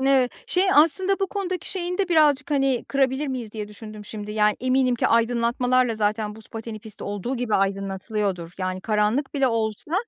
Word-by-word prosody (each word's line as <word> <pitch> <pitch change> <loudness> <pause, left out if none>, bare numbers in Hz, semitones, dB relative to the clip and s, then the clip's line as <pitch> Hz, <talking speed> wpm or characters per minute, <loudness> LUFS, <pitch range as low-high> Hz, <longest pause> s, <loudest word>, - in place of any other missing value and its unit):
Ni 265 -2 +4 0.2
şey, 365 +1 +2
"Aslında 370 +6 +4
bu 390 - +2
konudaki 370 -2 -4
şeyini 360 -1 -3
de 390 -2 +1
birazcık, 300 -4 +3
hani, 270 -4 +1
kırabilir 275 +1 +1
miyiz?" 245 -5 -5
diye 210 -2 -5
düşündüm 215 0 -10
şimdi. 210 0 -7
Yani, 210 -1 +2
eminim 255 0 +2
ki 240 - +1
aydınlatmalarla 240 +1 +2
zaten 210 0 -1
buz 220 0 -13
pateni 225 -1 -7
pisti 215 0 -9
olduğu 205 +6 -3
gibi 240 -3 -1
aydınlatılıyordur. 195 -2 -1
Yani, 185 0 -2
karanlık 215 +7 0
bile 275 -2 +2
olsa, 225 +4 -2
235 Hz, 175 wpm, -24 LUFS, 210-275 Hz, 0.2 s, Ni